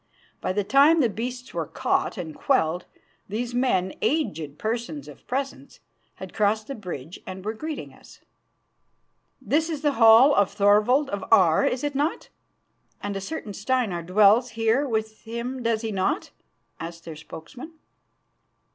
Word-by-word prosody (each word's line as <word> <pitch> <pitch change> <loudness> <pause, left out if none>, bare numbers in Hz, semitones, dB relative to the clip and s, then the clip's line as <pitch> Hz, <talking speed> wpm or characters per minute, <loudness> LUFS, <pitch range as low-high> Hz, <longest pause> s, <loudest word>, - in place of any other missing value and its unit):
By - - -1
the 205 +2 0
time 280 +9 +5
the 250 -6 +3
beasts 245 +4 -6
were - - -3
caught - - -1
and 165 -4 -5
quelled, 160 +4 0 0.4
these 235 +4 -3
men, 190 -7 +1
aged 165 - -1
persons 235 +6 -4
of - - -14
presence, 265 - -4 0.4
had 190 -2 -9
crossed 215 0 +1
the 275 - -6
bridge 175 - -7
and 185 +1 -7
were 215 - -1
greeting 310 +6 -6
us. - - -17 1.2
"This 320 +3 0
is 310 -2 -4
the 295 - +3
hall 225 +6 +8
of 200 -6 +3
Thorvald 210 +7 +3
of 200 -1 -3
Aar, 165 -4 +5
is 250 +2 -2
it 290 -1 -1
not? 290 +4 -2 0.7
And 205 0 -4
a 195 - -3
certain 215 -1 -6
Steinar 210 -4 -1
dwells 210 +7 +4
here 225 +6 +2
with 220 -1 -2
him, 235 +3 -5
does 230 -2 0
he 225 -1 -3
not?" 190 -2 -1 0.5
asked 165 0 -8
their 165 -2 -7
spokesman. 240 - -10
220 Hz, 155 wpm, -25 LUFS, 190-260 Hz, 1.2 s, hall